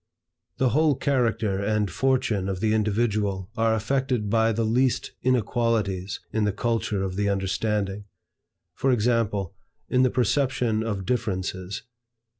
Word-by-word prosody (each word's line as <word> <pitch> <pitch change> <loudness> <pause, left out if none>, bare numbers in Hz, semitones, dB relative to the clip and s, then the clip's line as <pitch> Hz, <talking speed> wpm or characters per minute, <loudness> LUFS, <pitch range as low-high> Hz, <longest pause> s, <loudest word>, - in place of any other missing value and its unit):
The 130 - +3
whole 150 +4 +3
character 115 -8 0
and 105 -2 0
fortune 115 -4 +1
of 95 -1 -3
the 110 +2 +1
individual 105 -3 0
are 115 0 +2
affected 120 -1 -1
by 115 0 +3
the 115 +1 0
least 125 +3 +1
inequalities 115 -6 0
in 110 - +1
the 105 - +2
culture 110 -2 -1
of 95 -1 -3
the 100 0 +1
understanding; 100 +1 -1 0.7
for 135 - +1
example, 110 -5 +1 0.4
in 125 - +3
the 130 - +4
perception 125 -2 +1
of 105 -4 -3
differences. 95 -5 -2
110 Hz, 130 wpm, -25 LUFS, 100-120 Hz, 0.7 s, the